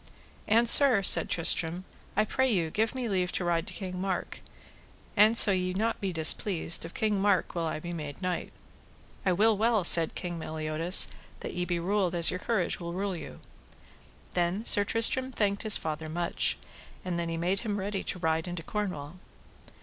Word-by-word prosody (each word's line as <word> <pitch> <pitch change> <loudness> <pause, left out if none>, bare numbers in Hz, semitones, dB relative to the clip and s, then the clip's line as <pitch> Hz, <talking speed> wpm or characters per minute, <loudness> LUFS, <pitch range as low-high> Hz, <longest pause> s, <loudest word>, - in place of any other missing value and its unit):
And 230 +2 +2
sir, 245 -5 +9
said - - +6
Tristram, 170 +1 +2 0.3
I 215 - +2
pray 260 +3 -1
you 170 -6 -1
give 220 +6 -2
me 255 -2 -4
leave 185 -4 -2
to 180 - -3
ride 170 +1 -1
to 190 - -6
King 185 0 -7
Mark; 190 -2 -4 0.8
and, 215 +3 +4
so 210 - +7
ye 185 -1 -2
be 190 - -4
not 225 +1 -2
displeased, 170 -1 +1
of 165 - -11
King 210 -3 -1
Mark 200 -3 0
will 170 -2 -3
I 155 - -5
be 175 +2 -8
made 150 -4 -8
knight. 180 -2 -4 0.8
I - - +3
will 215 +5 +2
well, 220 -1 0
said 165 -1 +3
King 175 -2 -6
Meliodas, 160 +3 +1 0.3
that - - -7
ye 180 0 -3
be 175 0 -3
ruled 185 0 -1
as 170 -1 +4
your 180 - -5
courage 210 -4 -2
will 170 -1 -7
rule 195 +1 -4
you. 160 - -10 0.9
Then 180 +5 -2
Sir 205 - +5
Tristram 230 +5 0
thanked 205 -4 -2
his 215 -2 +3
father 155 0 -6
much. 170 +2 -2 0.5
And 175 -2 -3
then 170 -1 -4
he 165 - -4
made 180 +4 -2
him 210 -2 -4
ready 195 0 -4
to - - -5
ride 160 -1 -2
into 175 -2 -7
Cornwall. 180 -5 -6
185 Hz, 190 wpm, -27 LUFS, 170-210 Hz, 0.9 s, sir